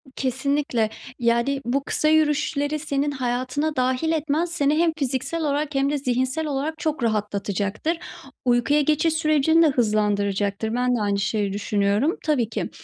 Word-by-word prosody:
Kesinlikle, 265 -2 0 0.3
yani, 235 +4 +1
bu 270 +4 0
kısa 305 - 0
yürüyüşleri 300 -1 +1
senin 290 -1 -1
hayatına 260 +3 -2
dâhil 255 +4 +1
etmen, 315 +1 0
seni 300 -3 0
hem 335 0 +3
fiziksel 275 +3 -2
olarak 295 0 -1
hem 275 +1 +2
de 295 - 0
zihinsel 260 +3 -1
olarak 295 +3 -2
çok 310 -5 -2
rahatlatacaktır. 210 - -1 0.5
Uykuya 250 +5 +3
geçiş 305 +2 +2
sürecini 320 0 +3
de - - +5
hızlandıracaktır. 210 -3 0
Ben 250 0 +1
de 230 - -1
aynı 200 -1 0
şeyi 200 0 -1
düşünüyorum. 205 - 0
Tabii 270 -8 +1
ki, 225 - -3
270 Hz, 145 wpm, -23 LUFS, 230-300 Hz, 0.5 s, de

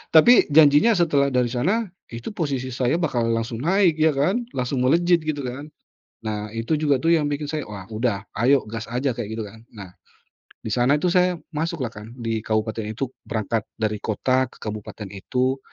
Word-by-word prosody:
Tapi 240 +10 +9 0.2
janjinya 150 +8 +6
setelah 145 -6 +2
dari 125 -1 +2
sana, 180 - 0 0.3
itu 115 0 -6
posisi 135 - -2
saya 130 +6 0
bakal 120 -9 0
langsung 115 0 -2
naik 180 -2 +3
ya 155 0 +4
kan, 190 - +1
langsung 125 0 -1
melejit 170 +4 +3
gitu 150 -2 -2
kan. 135 +4 -6 0.6
Nah 105 -1 -3
Itu 115 +7 -2
juga 145 -3 +2
tuh 165 +5 +3
yang 150 -2 +1
bikin 145 +1 -2
saya, 150 0 -3
"Wah, 100 -3 -8
udah 110 -3 -1 0.2
ayo 135 +2 +4
gas 115 +1 -6
aja," 125 +2 0
kayak 115 -3 -5
gitu - - -2
kan. 110 +2 -13
Nah, 100 -5 -11 0.7
di 110 - -5
sana 125 +6 +3
tuh 180 - +2
saya 180 0 +3 0.2
masuk 160 0 -3
lah 115 - -3
kan 105 +1 -10
di 115 -2 -2
kabupaten 110 0 -1
itu 130 +2 -4 0.2
berangkat 110 -1 -2
dari 105 -1 -2
kota 130 +4 0
ke - - -19
kabupaten 105 -1 -6
itu 130 +7 -1
130 Hz, 185 wpm, -23 LUFS, 115-155 Hz, 0.7 s, Tapi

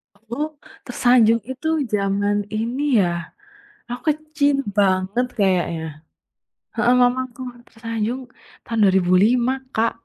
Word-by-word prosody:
Aduh 235 +8 -4 0.4
"Tersanjung" 240 -2 +3
itu 265 +5 -5 0.3
zaman 200 0 +1 0.2
ini 245 +5 -2 0.2
ya. 175 - +1 0.8
Aku 245 0 -5
kecil 305 -2 0 0.2
banget 195 +4 +2
kayaknya. 175 -4 +1 0.9
Heeh, 245 - +3
mamaku 255 0 0 0.3
"Tersanjung" 230 +2 -4 0.4
tahun 230 -2 -3
2005, 195 +7 +3 0.2
Kak. 225 +1 +2
230 Hz, 95 wpm, -21 LUFS, 200-250 Hz, 0.9 s, Tersanjung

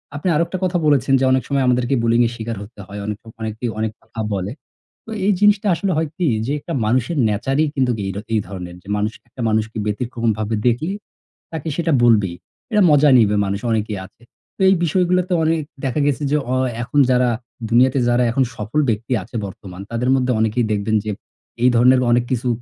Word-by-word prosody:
আপনি 145 +6 -3
আরেকটা 170 +4 0
কথা 180 -1 +1
বলেছেন 135 -2 +3
যে 135 - 0
অনেক 130 0 +2
সময় 140 -1 +1
আমাদেরকে 125 +1 +2
bullying 115 +1 +3
এর - - -5
শিকার 115 -1 -5
হতে 105 +2 -15
হয়, 100 +1 -7
অনেক 105 -1 -3
সময় 115 0 -15
অনেকেই 110 +2 -3
অনেক 110 0 -1
কথা - - -11
বলে। 95 +1 -2 0.5
তো 225 - -9
এই 205 - +4
জিনিসটা 210 0 +4
আসলে 195 +3 -1
হয় 160 -2 0
কি 180 - +1 0.2
যে 135 - -2
একটা - - -6
মানুষের 130 +8 0
nature 135 +7 -1
ই - - +3
কিন্তু 130 -3 +2
এ - - -2 0.3
এই 110 - +3
ধরনের। 90 -3 -7 0.2
মানুষ 105 +2 0 0.2
একটা 120 +2 -10
মানুষকে 110 +1 -1
ব্যতিক্রমভাবে 110 -1 -1
দেখলে 145 +10 0 0.6
তাকে 160 -1 -5
সেটা 170 -1 0
বলবেই। 105 -7 +3 0.4
এটা 210 -1 +3
মজা 145 0 +5
নিবে, 105 -3 +4
মানুষ 100 +1 -2
অনেকেই 105 -2 -1
আছে। 115 - -20 0.3
তো - - -7
এই 190 - +5
বিষয়গুলোতে 180 +2 +1
অনেক 160 0 +1 0.2
দেখা 135 +3 -1
গেছে 145 +1 0
যে 150 - +3 0.2
অ - - +2 0.3
এখন 145 +4 0
যারা 125 0 +3 0.4
দুনিয়াতে 130 +3 +4
যারা 120 +1 +3
এখন 130 +3 +2
সফল 110 +8 -2
ব্যক্তি 115 +3 -1
আছে 115 - -14
বর্তমান, 95 -1 -9
তাদের 120 +2 -1
মধ্যে 130 -1 +1
অনেকেই 110 +2 +1
দেখবেন 105 +2 0
যে 105 - -1 0.5
এই 125 - +6
ধরনের 125 +2 +5
অনেক 120 0 +3
কিছু 125 0 -1
120 Hz, 195 wpm, -20 LUFS, 110-145 Hz, 0.6 s, এই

